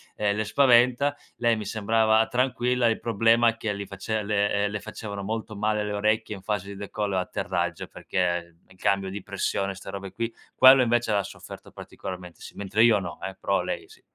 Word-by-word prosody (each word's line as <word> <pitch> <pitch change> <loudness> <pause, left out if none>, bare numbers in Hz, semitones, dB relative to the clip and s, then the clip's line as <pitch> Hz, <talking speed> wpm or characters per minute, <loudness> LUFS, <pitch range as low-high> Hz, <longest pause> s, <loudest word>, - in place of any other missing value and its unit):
ehm, 105 -1 0
le 110 - 0
spaventa. 125 +3 +4 0.2
Lei 120 -1 +2
mi 105 -1 -5
sembrava 110 +1 +2
tranquilla, 125 -1 +1
il 115 - +1
problema 115 +1 +3
è 115 - -5
che 110 -2 -2
li 100 -1 -6
face 105 +3 -3
le 105 0 +1
ehm, 100 - -2
le 105 - -3
facevano 100 -3 -7
molto 110 +1 -4
male 105 0 0
le 105 - -3
orecchie 110 +1 0
in 95 - -11
fase 105 -1 -2
di 100 - -7
decollo 100 0 -3
e - - +2
atterraggio, 90 -1 -2
perché 85 -2 -2
in 95 - -20
cambio 100 0 0
di 100 0 -6
pressione 100 -1 -2
ste 95 - -10
robe 100 -1 -6
qui, 115 +3 -3 0.2
quello 130 0 +8
invece 120 -1 +1
l'ha 100 -1 +2
sofferto - - -11
particolarmente, 90 -2 -9
sì, - - -10
mentre 100 +3 +1
io 110 -4 +5
no, 90 -3 -6
eh, 95 0 -5
però - - +1
lei - - -4
sì. - - -18
105 Hz, 205 wpm, -26 LUFS, 100-115 Hz, 0.2 s, quello